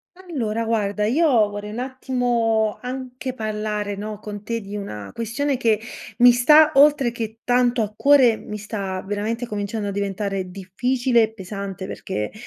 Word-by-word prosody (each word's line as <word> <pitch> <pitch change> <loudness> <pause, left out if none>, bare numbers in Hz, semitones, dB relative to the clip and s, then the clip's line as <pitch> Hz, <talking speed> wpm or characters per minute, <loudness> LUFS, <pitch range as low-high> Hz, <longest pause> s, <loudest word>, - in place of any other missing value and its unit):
Allora 240 -12 -3
guarda, 210 -2 0
io 300 +10 +3 0.2
vorrei 205 0 -6
un 215 - -7
attimo 245 -4 0
anche 255 0 -5
parlare, 210 -2 -3
no, 210 +1 -5
con 210 -1 -8
te 230 +1 -3
di 200 0 -8
una 105 - -6
questione 255 +5 -1
che 225 -4 +2 0.4
mi 245 0 +9
sta, 300 +6 +6
oltre 280 -3 +5
che 225 -2 -6
tanto 245 -1 +2
a 210 - -5
cuore, 265 -3 +5
mi 210 -1 -7
sta 200 -3 -4
veramente 215 +4 -2
cominciando 205 -1 -3
a - - -2
diventare 195 -1 -3
difficile 240 +7 0
e 220 0 0
pesante, 195 -1 -6
perché 145 - -4
220 Hz, 155 wpm, -22 LUFS, 205-245 Hz, 0.4 s, mi